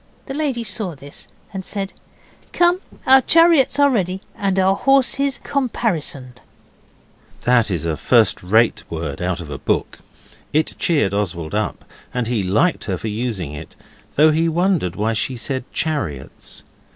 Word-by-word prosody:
The 270 - -6
lady 275 -5 -1
saw 190 -5 -3
this, 140 +1 -12 0.3
and 190 -1 -5
said 195 0 -4 0.6
'Come, 350 +1 +3 0.2
our 265 0 +8
chariots 330 -2 +4
are 285 -1 +5
ready, 190 -5 -1
and 195 -1 -1
our 190 0 +3
horses 275 +3 +2
caparisoned.' 165 - -2 1.0
That 120 -2 +3
is 85 -4 -2
a 80 -2 -1
first 115 -5 +3
rate 110 +6 +2
word 80 -3 -5
out 90 0 -2
of 75 -3 -9
a - - -5
book. - - -2 0.5
It 155 +1 +1
cheered 145 - +1
Oswald 85 -5 -2
up, 105 +1 -2 0.3
and 125 -1 0
he 115 -2 -1
liked 110 - +1
her 95 -3 -2
for 110 - -5
using 105 - -3
it, 75 +2 -10 0.4
though 155 +2 +5
he 165 +2 +1
wondered 170 - 0
why 110 +3 0
she 120 +4 -1
said 130 +1 -3
chariots. 85 - -4
145 Hz, 150 wpm, -20 LUFS, -, 1.0 s, our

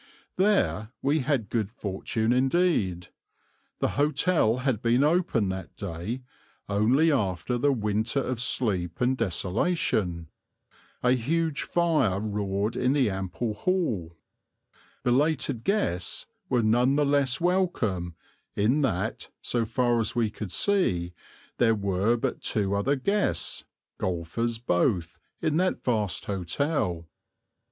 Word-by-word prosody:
There 190 - +2
we 145 +3 +2
had 130 -5 0
good 110 -2 -1
fortune 110 +1 -2
indeed. 130 - +1 0.7
The - - 0
hotel 145 -4 +2
had 125 -6 +1
been 120 +3 +3
opened 150 - +2
that 95 0 -7
day 100 +7 -5 0.4
only 120 +11 +3
after 100 - 0
the 145 +3 +3
winter 110 +1 0
of 130 -3 -2
sleep 95 -10 -1
and 125 +1 +2
desolation; 95 - -1 0.7
a 125 - +4
huge 150 +5 0
fire 160 - +1
roared 105 0 -2
in 125 +2 +2
the 130 -7 +2
ample 95 +4 -3
hall; 105 - -1 0.9
belated 130 -1 +1
guests 145 - -1 0.2
were 120 -2 +2
none 120 +5 +3
the 145 0 +3
less 140 -2 +2
welcome 120 - 0 0.4
in 120 +9 +2
that, 110 -3 -1
so 120 -2 -1
far 120 +1 +1
as 115 - 0
we 115 -3 +1
could 105 -3 -6
see, 90 - +1 0.5
there 115 -2 +4
were 100 +3 +1
but - - -2
two 100 -2 0
other 100 +8 +1
guests, 200 +10 0 0.3
golfers 95 +7 -2
both, 90 - 0 0.2
in 155 0 +1
that 185 +1 0
vast 110 -6 0
hotel. 95 - -1
115 Hz, 120 wpm, -27 LUFS, 100-140 Hz, 0.9 s, a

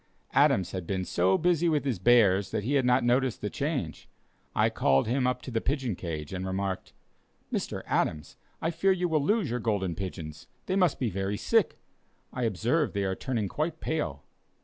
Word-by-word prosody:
Adams 95 -1 +3
had 90 -3 -5
been 95 -2 -1
so 90 +2 +2
busy 175 0 +2
with 150 -3 +1
his 125 -9 -1
bears 100 -3 +4
that - - -2
he 130 +7 -1
had 135 -3 +3
not 125 0 +3
noticed 125 +1 +2
the 105 - -4
change. 140 - -3 0.5
I - - +3
called 70 0 +2
him 125 +2 +1
up 125 0 -1
to 130 - -7
the 115 -1 0
pigeon 130 -6 -1
cage, 80 -2 -5
and 95 0 -3
remarked: 95 0 -3 0.6
"Mr. - - -2
Adams, 75 -1 -1 0.3
I 165 - +1
fear 180 +4 +2
you 180 -1 0
will 155 -3 +1
lose 200 - +1
your 125 - -1
Golden 100 -6 -1
Pigeons; 80 -4 -7 0.2
they 185 - -1
must 180 -6 +3
be 120 -5 0
very 95 +2 -2
sick; - - +2 0.6
I 125 -1 -1
observe 120 - 0
they 100 -1 -1
are 95 -1 0
turning 110 0 -2
quite 155 - -2
pale." 80 - -3
115 Hz, 195 wpm, -28 LUFS, 95-140 Hz, 0.6 s, bears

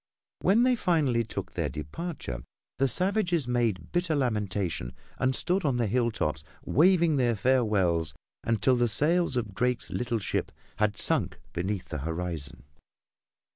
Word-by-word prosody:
When 215 +5 +4
they 255 0 +4
finally 150 - +2
took 110 - -6
their - - -1
departure 75 - -5 0.4
the 135 - +4
savages 180 - +2
made 115 -8 0
bitter 175 -2 0
lamentation 100 - -1 0.3
and 130 0 +2
stood 185 +2 0
on 135 -5 +1
the 120 - +1
hilltops 110 - 0 0.2
waving 170 0 +4
their 120 -3 +2
farewells 95 -10 +1 0.3
until 115 +3 +2
the 120 0 +2
sails 160 +7 +2
of 110 -5 -2
Drake's 125 +3 -1
little 120 -1 -1
ship 100 - -2 0.3
had 105 -1 +1
sunk - - 0
beneath 95 +2 -3
the 75 - -4
horizon. 80 -3 -5
120 Hz, 135 wpm, -28 LUFS, 95-150 Hz, 0.4 s, When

